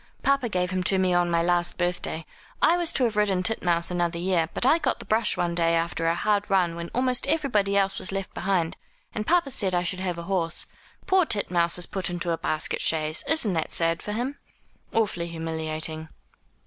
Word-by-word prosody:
"Papa 275 -3 +2
gave 180 -2 -1
him 185 0 -1
to 190 - +4
me 185 -1 +2
on 175 0 +2
my 170 -1 +2
last 175 0 +1
birthday. 175 -2 -2 0.3
I 335 - +4
was 345 -2 0
to 260 - +1
have 230 -3 +1
ridden 200 -3 +1
Titmouse 175 -5 +1
another 175 -1 -1
year; 170 -2 0
but - - -2
I 315 +6 +5
got - - 0
the - - -9
brush 220 0 +2
one 175 -1 0
day 170 -1 +2
after 165 0 -1
a 165 - +2
hard 205 +2 +1
run 180 -4 +2
when 170 0 -6
almost 255 0 0
everybody 210 -11 +1
else 195 -1 +1
was 185 - 0
left 195 -1 -4
behind, 180 -4 -1 0.4
and 215 0 -4
papa 340 -5 +2
said 195 -7 0
I 175 - +1
should 185 +1 -3
have 180 -2 -2
a 170 - -5
horse. 170 -2 +1 0.4
Poor 380 -1 +4
Titmouse 175 -5 +1
is 175 - +3
put 190 -1 -2
into 175 0 -2
a 165 - 0
basket 155 - -1
chaise. 155 -1 +2
Isn't 260 - +3
it 160 - -2
sad 165 0 +1
for 210 - -4
him?' 255 +6 -3 0.5
"Awfully 200 -6 0
humiliating." 160 -1 -4
180 Hz, 210 wpm, -25 LUFS, 170-210 Hz, 0.5 s, I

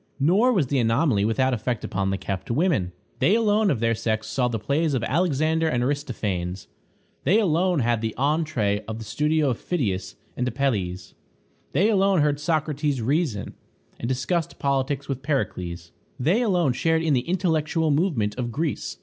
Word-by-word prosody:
Nor 190 - +4
was 185 - +2
the 135 +1 0
anomaly 115 -2 +2
without 130 +4 +1
effect 120 +1 -2
upon 95 0 -1
the 95 - -1
kept 95 -1 -5
women. 125 - +1 0.3
They 165 +11 +4
alone 215 -2 +3
of 135 - 0
their 115 0 +2
sex 110 -1 -2
saw 125 -2 0
the 120 -2 -2
plays 140 +7 0
of 120 - -1
Alexander 160 +2 +1
and 120 -6 0
Aristophanes; 105 - -2 0.6
they 205 +5 +4
alone 175 -4 +2
had 120 -1 +1
the 110 -1 -3
entrée 135 -8 0
of 110 0 -4
the 110 - -8
studio 150 +5 +1
of 120 - -4
Phidias 110 - -2 0.2
and 125 - -1
Apelles; 100 -9 -2 0.6
they 180 +9 +3
alone 195 -4 +3
heard 145 -1 +1
Socrates 150 -2 0
reason, 130 - -1 0.5
and 115 - -3
discussed 155 +6 -1
politics 140 0 -1
with 135 -2 -3
Pericles; 90 - -3 0.3
they 170 - +2
alone 180 - +2
shared 160 +5 +1
in 160 -3 +2
the 130 +4 0
intellectual 160 -3 +1
movement 140 - +1
of 120 -1 -2
Greece. 155 +3 -3
140 Hz, 165 wpm, -24 LUFS, 115-160 Hz, 0.6 s, Nor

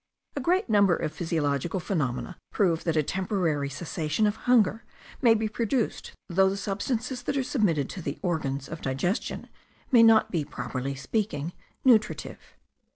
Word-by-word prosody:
A 285 - -2
great 360 +7 +1
number 200 -5 +4
of 155 - -3
physiological 160 0 -1
phenomena 155 - -2 0.2
prove 175 -6 +1
that 165 -2 +1
a 155 - +3
temporary 175 -5 -1
cessation 155 +5 -1
of 210 0 +1
hunger 225 -2 +4 0.4
may 235 -4 +6
be 220 0 0
produced 230 +2 -2
though 190 +1 +3
the 195 - -3
substances 230 +6 -2
that 275 - -2
are 265 - +1
submitted 185 - +1
to 185 - -7
the 145 -2 -4
organs 140 -6 -2
of 165 0 -7
digestion 135 - -2 0.4
may 240 -3 +7
not 225 -1 +6
be, 165 -4 0
properly 130 +1 -4
speaking, 165 - -2 0.3
nutritive. 220 -4 +2
185 Hz, 155 wpm, -27 LUFS, 150-220 Hz, 0.4 s, may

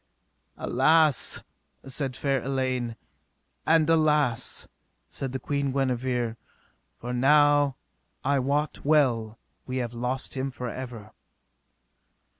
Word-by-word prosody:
Alas, 155 +2 +3 0.4
said 135 -1 -3
fair 135 -1 0
Elaine, 130 -3 -2 0.7
and 160 -1 +4
alas, 150 -6 +2 0.4
said 135 -2 -3
the 130 - -2
Queen 140 -1 -1
Guenever, 125 -3 -1 0.6
for 125 +1 -5
now 145 +1 +4 0.5
I 140 +1 +2
wot 140 +3 -1
well 120 -7 +2 0.3
we 130 0 -3
have 120 -2 -3
lost 125 +2 -3
him 135 0 -2
for 125 -1 -6
ever. 115 -4 -8
130 Hz, 100 wpm, -26 LUFS, 125-145 Hz, 0.7 s, and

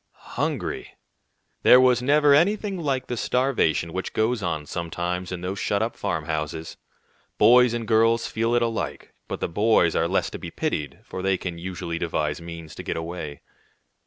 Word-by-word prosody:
Hungry! - - -3 0.7
There - - +8
never - - +6
was 125 -1 +4 0.4
anything 200 0 -1
like 135 -5 -1
the 120 - -3
starvation 120 - +1
which 95 - -4
goes 110 +1 +1
on 80 -5 -2
sometimes 85 +3 -3
in 90 -1 -4
those 95 +2 -4
shut 100 +1 0
up 115 - -3
farmhouses. 80 0 -3 0.6
Boys 120 +2 +6
and 115 -2 -4
girls 115 +1 +3
feel 115 +2 0
it 120 - +3
alike; 115 -11 -3
but - - -5
the - - 0
boys 105 -2 +3
are 80 - +2
less 95 +3 0
to - - -6
be - - -6
pitied, 75 -3 -3
for 95 - -6
they 95 0 +1
can 85 -2 -5
usually 85 -1 -4
devise 80 -2 -2
means 85 -2 -9
to - - -7
get - - -3
away. 80 -3 -6
95 Hz, 170 wpm, -24 LUFS, 85-115 Hz, 0.7 s, There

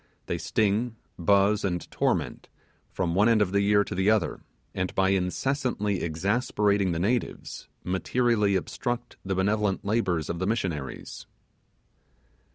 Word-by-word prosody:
They - - -2
sting, 110 +3 0 0.2
buzz, 100 +4 +3
and 90 -3 -1
torment, - - -1 0.4
from 90 -3 -2
one 100 +5 +4
end 115 -2 +4
of 100 -3 +2
the 100 0 +2
year 100 0 +4
to - - -6
the 95 +3 +2
other, 110 -5 +1 0.3
and 90 0 -3
by 95 0 +3
incessantly 105 +2 0
exasperating 100 +3 +1
the 85 - -1
natives 110 +8 -2 0.2
materially 105 +2 +1
obstruct 120 +6 -3
the 95 0 -2
benevolent 100 +1 0
labours 95 -8 0
of 85 - -3
the 95 - -1
missionaries. 90 - -3
100 Hz, 135 wpm, -27 LUFS, 95-110 Hz, 0.4 s, one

